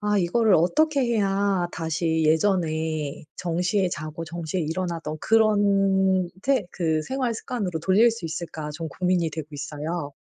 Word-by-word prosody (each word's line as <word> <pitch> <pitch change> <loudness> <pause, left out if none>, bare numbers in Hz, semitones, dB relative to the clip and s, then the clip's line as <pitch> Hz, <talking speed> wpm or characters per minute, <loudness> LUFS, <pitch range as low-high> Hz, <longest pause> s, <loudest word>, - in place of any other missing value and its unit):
'아 210 0 +1
이거를 200 +3 +3
어떻게 290 - +2
해야 200 -5 +1
다시 160 0 -1
예전에 160 -3 0
정시에 180 +2 0
자고 155 +1 -5
정시에 170 +2 -4
일어나던 165 -1 -3
그런 195 -4 +3
태 265 -7 +1
그 160 -3 0
생활 255 - -2
습관으로 205 -7 -3
돌릴 195 +7 +4
수 230 -5 -7
있을까?' 155 -1 -5
좀 165 +1 -5
고민이 180 +1 0
되고 155 -1 -6
있어요. 150 +1 -4
175 Hz, 300 characters per minute, -25 LUFS, 160-200 Hz, -, 돌릴